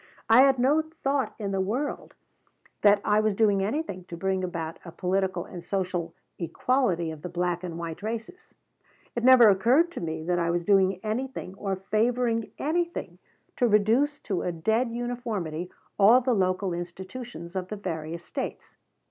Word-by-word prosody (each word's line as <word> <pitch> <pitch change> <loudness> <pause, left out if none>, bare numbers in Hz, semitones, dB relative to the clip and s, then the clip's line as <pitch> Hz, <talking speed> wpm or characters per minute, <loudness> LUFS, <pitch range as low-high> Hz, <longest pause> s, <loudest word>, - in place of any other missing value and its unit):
I 235 +3 +9
had 270 -1 +5
no 275 +6 +3
thought 285 -4 -2
in 200 -3 -3
the 195 -1 0
world 245 +10 -3 0.7
that 205 -1 +5
I 210 0 +4
was 215 -2 +1
doing 205 -2 +3
anything 205 - -3
to 170 - -8
bring 190 +1 -1
about 165 -3 -4
a 170 - -9
political 185 0 -1
and 175 -2 -9
social 180 -2 -2 0.2
equality 175 - 0
of 155 -2 -9
the 180 - -6
black 175 0 -1
and 170 -2 -5
white 165 0 -6
races. 230 - -6 0.6
It 235 - -2
never 255 -2 +8
occurred 240 - +4
to - - -6
me 160 -1 -4
that 175 +1 0
I 170 -1 0
was 170 0 -1
doing 190 -1 +3
anything 225 -2 -3
or 195 0 -3
favoring 230 +4 0
anything 340 +3 -2 0.4
to 245 - +3
reduce 230 +8 +3
to 195 -4 -2
a 180 - -1
dead 220 +9 0
uniformity 230 -9 -4 0.3
all 220 +5 +7
the 255 0 +1
local 185 -2 0
institutions 180 +2 -7
of 185 -1 -2
the 210 - -5
various 170 -3 -5
States. - - -6
195 Hz, 165 wpm, -27 LUFS, 175-240 Hz, 0.7 s, I